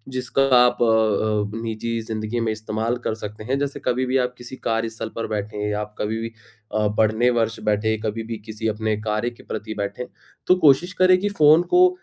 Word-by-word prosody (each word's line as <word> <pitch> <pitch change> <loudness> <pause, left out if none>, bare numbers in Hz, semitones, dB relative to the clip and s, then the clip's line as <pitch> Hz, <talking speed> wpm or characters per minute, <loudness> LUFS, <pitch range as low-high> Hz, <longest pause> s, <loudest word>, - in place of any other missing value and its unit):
जिसका 130 +2 +1
आप 125 0 +4
अ - - +5
अ, 110 -2 +2
निजी 115 +1 -3
ज़िंदगी 110 +1 -3
में 115 -1 0
इस्तेमाल 110 +2 -2
कर - - 0
सकते 105 0 -8
हैं। 130 +4 -1
जैसे 140 -1 -2
कभी 125 +1 +1
भी 130 +1 +1
आप 125 - -6
किसी 120 +2 -9
कार्य 115 0 0
स्थल 110 0 -6
पर 115 - -3
बैठे 105 0 -4
हैं 105 0 -1
या 105 0 -1
आप 105 0 -8
कभी 110 +1 -1
भी 115 - -3 0.5
अ, 105 -1 +2
पढ़ने 110 +3 +3
वर्ष 115 0 -1
बैठे 110 +1 +1
कभी 110 +1 -2
भी 115 - -2
किसी 110 0 -4
अपने 110 0 -1
कार्य 110 +2 -1
के 120 - -17
प्रति 110 0 -5
बैठें, 100 +4 -3 0.4
तो 180 - +6
कोशिश 175 +2 +4
करें 185 0 +7
कि 205 +2 -1
फ़ोन 155 -3 +5
को 365 0 +8
110 Hz, 215 wpm, -22 LUFS, 110-125 Hz, 0.5 s, को